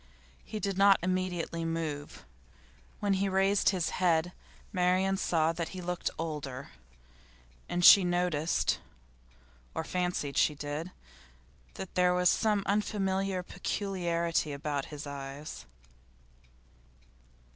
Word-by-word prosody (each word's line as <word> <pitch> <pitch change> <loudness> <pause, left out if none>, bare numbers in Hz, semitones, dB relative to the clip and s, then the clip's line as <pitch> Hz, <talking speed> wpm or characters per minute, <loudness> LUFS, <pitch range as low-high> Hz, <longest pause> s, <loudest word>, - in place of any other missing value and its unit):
He 215 - -6
did 195 -1 -2
not 195 0 +7
immediately 180 -2 -1
move. 160 -3 -4 0.8
When 205 -1 +2
he 195 +1 +1
raised 195 +1 +3
his 180 -4 0
head 175 -1 +3 0.4
Marian 185 +1 +2
saw 165 -3 +1
that 165 -1 -3
he - - -4
looked 180 0 -2
older, 145 -5 -5 1.0
and 175 0 +1
she 200 - +10
noticed 175 -3 +1 1.0
or - - -1
fancied 180 -6 -2
she 150 - +3
did 150 +4 -4 0.9
that 190 - -7
there 180 0 +3
was 180 0 +4
some 210 -2 +1
unfamiliar 195 -2 0
peculiarity 170 -6 -1
about 140 -1 -3
his 150 0 -8
eyes. 140 - -7
175 Hz, 110 wpm, -30 LUFS, 155-190 Hz, 1.0 s, she